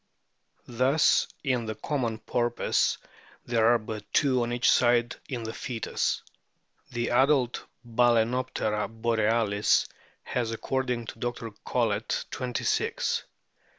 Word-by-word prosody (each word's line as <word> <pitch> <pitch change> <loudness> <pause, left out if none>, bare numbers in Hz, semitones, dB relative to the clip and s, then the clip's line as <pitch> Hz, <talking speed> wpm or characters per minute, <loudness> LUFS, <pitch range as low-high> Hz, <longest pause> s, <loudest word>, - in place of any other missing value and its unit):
Thus 130 +6 +3 0.2
in 125 -5 0
the 110 - -3
common 120 -1 -2
Porpoise 120 +1 0 0.5
there 115 -2 +2
are 120 0 +6
but 110 -2 -8
two 130 -3 +3
on 120 0 -1
each 120 +1 +3
side 120 0 +3
in 125 -4 -3
the 110 0 -5
foetus. 120 -3 -2 0.7
The 120 -1 -2
adult 130 0 +3 0.2
Bal&noptera 115 -2 +1
borealis 110 -2 +2 0.4
has, 120 -3 -2
according 125 +1 -2
to 115 - -9
Dr. 120 -1 -4
Collett,* 110 -3 0
twenty 125 -2 -3
six. - - 0
120 Hz, 115 wpm, -27 LUFS, 115-125 Hz, 0.7 s, are